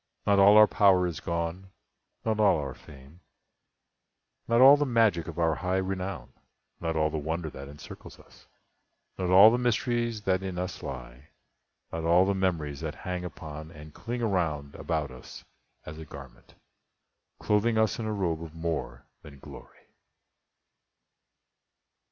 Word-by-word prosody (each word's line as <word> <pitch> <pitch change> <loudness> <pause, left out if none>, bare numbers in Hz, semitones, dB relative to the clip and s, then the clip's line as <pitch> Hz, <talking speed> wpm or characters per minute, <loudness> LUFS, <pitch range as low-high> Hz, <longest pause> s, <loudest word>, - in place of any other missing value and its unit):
Not 100 -1 +3
all 100 +2 +7
our 110 - +9
power 95 -4 +3
is 85 -4 -4
gone—not 90 +5 -6
all 105 -5 +4
our 70 -3 -4
fame— 70 +4 -16 1.3
Not 115 0 +2
all 135 +3 +9
the 145 - 0
magic 115 - +2
of 85 -1 -8
our 80 -2 +2
high 90 +3 -2
renown— 95 0 -4 0.5
Not 80 -1 -3
all 80 0 +1
the 80 - -2
wonder 80 +1 -4
that 70 +1 -9
encircles 75 +1 -12
us— - - -20 0.7
Not 90 -1 -1
all 100 +4 +8
the 120 - 0
mysteries 120 -2 -1
that 95 -1 +1
in 95 -2 -5
us 90 -2 -5
lie— 60 +1 -9 0.6
Not 85 0 -4
all 85 +3 +4
the 100 - +1
memories 85 -7 -2
that - - -5
hang 90 -1 -5
upon 80 -3 -8
And 75 -1 -13
cling 120 +1 -5
around 80 -9 -1
about 80 -5 -3
us 65 - -12 0.4
as 75 +1 -9
a 80 - -8
garment, - - -13 0.8
Clothing 110 +2 +1
us 110 +1 +1
in 110 - -3
a - - -2
robe 85 -6 -2
of 80 -1 -9
more 80 -7 -4 0.2
than 75 -2 -13
glory." - - -14
90 Hz, 150 wpm, -27 LUFS, 80-100 Hz, 1.3 s, our